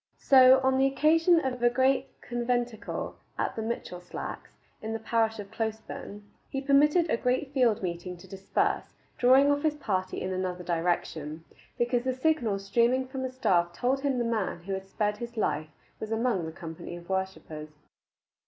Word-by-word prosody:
So 260 Hz, -1 st, +7 dB
on 265 Hz, 0 st, +2 dB
the 270 Hz, -, +5 dB
occasion 325 Hz, +5 st, +4 dB
of 250 Hz, -2 st, -2 dB
a 240 Hz, -, +5 dB
great 260 Hz, +2 st, +1 dB
conventicle 240 Hz, -2 st, -2 dB, 0.2 s
at -, -, -1 dB
Mitchelslacks, 220 Hz, -6 st, -5 dB, 0.3 s
in 220 Hz, +1 st, -4 dB
the 225 Hz, -, -3 dB
parish 225 Hz, 0 st, +1 dB
of 205 Hz, -1 st, -8 dB
Closeburn, 220 Hz, -2 st, -5 dB, 0.3 s
he 270 Hz, -, -2 dB
permitted 295 Hz, +5 st, +4 dB
a 235 Hz, -, +1 dB
great 260 Hz, +3 st, -1 dB
field 240 Hz, -7 st, +2 dB
meeting 175 Hz, 0 st, -4 dB
to 175 Hz, -, -14 dB
disperse, 195 Hz, -1 st, -1 dB, 0.2 s
drawing 265 Hz, +3 st, +6 dB
off 285 Hz, 0 st, +1 dB
his 310 Hz, -1 st, +1 dB
party 190 Hz, -10 st, -2 dB
in 185 Hz, -, -3 dB
another 185 Hz, -1 st, -3 dB
direction, 165 Hz, -2 st, -2 dB, 0.3 s
because 240 Hz, 0 st, +1 dB
the 260 Hz, -1 st, -1 dB
signal 255 Hz, -8 st, +1 dB
streaming 235 Hz, +6 st, +1 dB
from 265 Hz, -1 st, -4 dB
a -, -, -2 dB
staff 175 Hz, -9 st, +1 dB
told 260 Hz, +6 st, 0 dB
him 275 Hz, -2 st, 0 dB
the 240 Hz, -, 0 dB
man 215 Hz, -6 st, -2 dB
who 195 Hz, +2 st, -4 dB
had 190 Hz, 0 st, -5 dB
spared 210 Hz, +1 st, -1 dB
his 235 Hz, +1 st, -7 dB
life 155 Hz, -7 st, -1 dB, 0.3 s
was 220 Hz, -, -6 dB
among 225 Hz, -7 st, 0 dB
the -, -, -5 dB
company 165 Hz, 0 st, -8 dB
of 175 Hz, 0 st, -11 dB
worshippers. 190 Hz, -5 st, -4 dB
230 Hz, 170 wpm, -28 LUFS, 190-260 Hz, 0.3 s, So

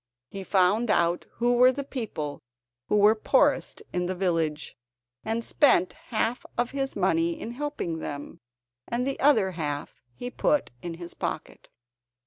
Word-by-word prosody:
He 195 Hz, -1 st, -6 dB
found 200 Hz, +5 st, +2 dB
out 170 Hz, -1 st, +2 dB
who 240 Hz, +1 st, +1 dB
were 250 Hz, +1 st, +7 dB
the 280 Hz, +2 st, -4 dB
people 215 Hz, -, -5 dB, 0.5 s
who -, -, +2 dB
were 210 Hz, +1 st, +6 dB
poorest 225 Hz, -, +2 dB
in 180 Hz, 0 st, 0 dB
the 185 Hz, -, -2 dB
village, 165 Hz, -5 st, -1 dB, 0.5 s
and 225 Hz, +1 st, -2 dB
spent 255 Hz, -, +3 dB
half 230 Hz, +1 st, -1 dB
of 240 Hz, 0 st, 0 dB
his 270 Hz, -1 st, -2 dB
money 170 Hz, -3 st, +1 dB
in 230 Hz, -, -5 dB
helping 245 Hz, -, -3 dB
them, 145 Hz, -2 st, -6 dB, 0.5 s
and 240 Hz, +1 st, -1 dB
the 275 Hz, 0 st, -2 dB
other 225 Hz, -10 st, +4 dB
half 150 Hz, -4 st, -4 dB
he 245 Hz, -, -6 dB
put 295 Hz, +3 st, +1 dB
in 170 Hz, -1 st, -5 dB
his 175 Hz, 0 st, -8 dB
pocket. -, -, -5 dB
205 Hz, 150 wpm, -27 LUFS, 170-245 Hz, 0.5 s, were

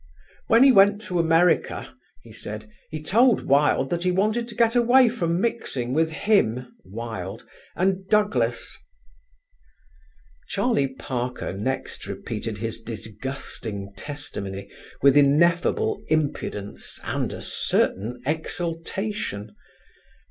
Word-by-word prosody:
"When 230 Hz, +3 st, +6 dB
he 270 Hz, -, +8 dB
went 200 Hz, -2 st, +6 dB
to 180 Hz, -4 st, -2 dB
America," 165 Hz, +1 st, +2 dB, 0.3 s
he -, -, -14 dB
said, 105 Hz, +1 st, -7 dB, 0.2 s
"he 155 Hz, -1 st, -6 dB
told 230 Hz, +8 st, +4 dB
Wilde 140 Hz, -1 st, +3 dB
that 170 Hz, -, 0 dB
he 180 Hz, -, +1 dB
wanted 215 Hz, +6 st, +1 dB
to 235 Hz, -, -9 dB
get 230 Hz, 0 st, +3 dB
away 245 Hz, +1 st, +6 dB
from 170 Hz, -7 st, -1 dB
mixing 135 Hz, -, -2 dB
with 160 Hz, +2 st, +2 dB
him 155 Hz, -, +1 dB
(Wilde) 105 Hz, 0 st, -6 dB, 0.3 s
and 190 Hz, 0 st, 0 dB
Douglas." 125 Hz, -, +1 dB, 1.7 s
Charlie 200 Hz, -, +1 dB
Parker 125 Hz, -8 st, -4 dB
next 120 Hz, +8 st, -4 dB
repeated 110 Hz, -2 st, -5 dB
his 115 Hz, +2 st, -4 dB
disgusting 110 Hz, -3 st, -6 dB
testimony 100 Hz, -9 st, -5 dB, 0.3 s
with 140 Hz, -1 st, +6 dB
ineffable 170 Hz, -, +3 dB
impudence 140 Hz, -9 st, -2 dB
and -, -, -2 dB
a -, -, -7 dB
certain 120 Hz, +6 st, 0 dB
exultation. 165 Hz, -, -3 dB
155 Hz, 110 wpm, -24 LUFS, -, 1.7 s, he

